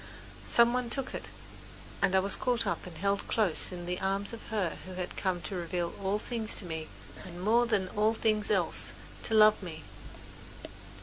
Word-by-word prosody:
Some 235 0 +5
one 250 -1 -1
took 265 +2 -3
it, - - -4 0.7
and 190 - +3
I - - +6
was 200 +1 +1
caught 240 -2 +1
up 195 - -2
and 170 -3 -9
held 200 +3 0
close 205 -7 +2
in 175 -1 -6
the 180 +1 -2
arms 195 +3 -1
of 230 - -7
her 200 -7 -1
who 185 - -7
had 180 -1 -5
come 185 -3 -1
to 155 - -4
reveal 175 0 -2
all 195 +1 +1
things 225 0 -3
to 195 - -5
me, 160 -2 -5 0.4
and, 175 -3 -9
more 230 +5 +3
than 205 -5 +1
all 215 +3 +2
things 215 -2 +1
else, - - +1 0.3
to 220 - 0
love 215 -1 +7
me. 160 -4 -7
200 Hz, 190 wpm, -30 LUFS, 180-220 Hz, 0.7 s, love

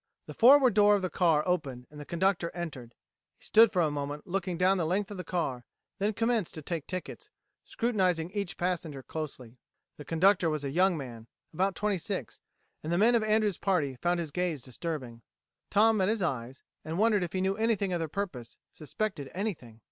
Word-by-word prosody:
The - - -9
forward 255 0 +6
door 205 0 +5
of 200 - -2
the 185 - -2
car 165 -3 +2
opened 135 -9 -2
and 150 - -11
the 150 - -8
conductor 170 +2 0
entered. 140 -9 -7 0.4
He - - -25
stood 225 +1 +6
for 180 -5 +2
a 155 - +1
moment 145 0 -4
looking 185 -1 -2
down 185 +2 +3
the 165 - 0
length 200 +4 -1
of 205 - -6
the 180 - -5
car, 135 -10 -2 0.4
then 205 +2 0
commenced 225 -3 0
to 155 - -7
take 165 -1 -4
tickets, 185 -1 -6 0.4
scrutinizing 185 -8 0
each 200 -2 -4
passenger 170 -6 -2
closely. 130 -6 -7 0.4
The 150 - -8
conductor 180 +1 +3
was 155 -2 -2
a 140 - -3
young 180 +3 +3
man 120 -5 -8 0.3
about 190 +4 0
twenty 210 -3 0
six - - -5 0.4
and 155 - -4
the 170 - +2
men 225 +5 +5
of 235 - +4
Andrews' 215 -3 +1
party 155 -9 0
found 175 +7 0
his 160 -3 -4
gaze 170 -5 -2
disturbing. 130 -3 -6 0.5
Tom 220 +2 +4
met 190 0 +2
his 220 -3 0
eyes, 130 -4 -3 0.2
and 160 +2 -4
wondered 210 -2 +3
if 170 - -5
he 185 - -1
knew 190 +1 +1
anything 210 -4 0
of 175 - 0
their 165 - -2
purpose, 150 - -5 0.2
suspected 155 -2 -4
anything. 165 - -4
175 Hz, 200 wpm, -29 LUFS, 150-200 Hz, 0.5 s, forward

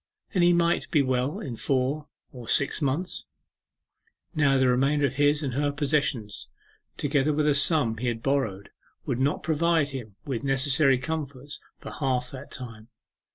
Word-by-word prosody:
'Then 185 - +2
he 175 0 +6
might 170 0 +1
be 150 -3 +3
well 130 +2 -1
in 125 -4 -5
four 135 +5 -1 0.2
or 125 -3 -10
six 140 +6 +1
months.' 150 +6 -1 1.1
Now 145 -4 +3
the 130 -1 +3
remainder 135 +4 +2
of 135 - -1
his 145 +2 +2
and 135 -3 -2
her 145 +2 0
possessions, 140 -7 -1 0.5
together 145 0 +1
with 150 0 +1
a 150 - +4
sum 140 -5 +3
he 125 +3 -3
had 115 -1 -2
borrowed, 115 -9 -1 0.3
would 120 - -2
not 140 +3 0
provide 160 -1 +2
him 120 -7 -8
with 130 -5 -3
necessary 135 0 +3
comforts 140 0 -5 0.2
for - - -9
half 130 -3 -1
that 135 +1 -9
time. 115 -4 -9
140 Hz, 160 wpm, -26 LUFS, 125-150 Hz, 1.1 s, he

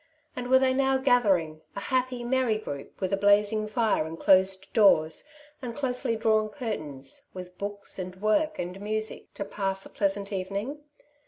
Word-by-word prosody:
and 245 0 -4
were 260 - +7
they 260 0 +3
now 265 0 +2
gathering, 195 - +2
a - - -3
happy, 255 +2 -1
merry 245 -3 +1
group, 145 -10 -8
•with 190 -2 -2
a 195 - +2
blazing 205 +2 +3
fire, 215 -5 +1
and 160 +1 -7
closed 190 0 +3
doors, 160 -8 +4 0.4
and 240 -3 -5
closely 250 -4 -1
drawn 220 -1 +2
curtains 155 - -5
— - - -37
with 180 -1 -8
books, 200 -1 -5
and 185 0 -5
work, 305 +10 +1
and 180 +2 -5
music, 215 +1 -3
to 200 - -4
pass 195 -1 -2
a - - -12
pleasant 200 0 -1
evening 200 +9 -3
210 Hz, 170 wpm, -27 LUFS, 190-245 Hz, 0.4 s, were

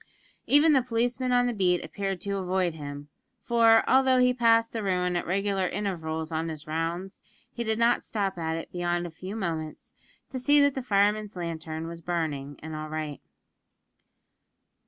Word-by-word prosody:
Even 300 +3 +5
the 270 - +5
policeman 245 +1 -1
on 245 0 +4
the 245 - 0
beat 180 -4 +1
appeared 195 -2 -3
to 200 0 -2
avoid 185 -2 0
him; 145 -1 -8 0.3
for, 230 -2 +4
although 260 0 +4
he 250 0 +4
passed 230 -2 +3
the 225 - -2
ruin 180 -2 0
at 175 - -2
regular 195 0 0
intervals 160 -5 -3
in 160 +1 -2
his 155 -2 -7
rounds, 165 +5 -3 0.3
he 235 - -3
did 220 -1 0
not 235 +1 +3
stop 200 -3 -2
at 160 -2 -2
it 165 - -7
beyond 175 0 -1
a 175 - -6
few 185 +5 -7
moments, 165 -7 -4 0.4
to 260 - -3
see 290 +3 +4
that 285 -1 +4
the 265 - -3
fireman's 210 -2 +1
lantern 165 -2 -5
was 170 0 -7
burning 155 -5 -3
and 160 0 -6
all 155 0 -5
right. 155 -2 -4
190 Hz, 175 wpm, -27 LUFS, 165-230 Hz, 0.4 s, Even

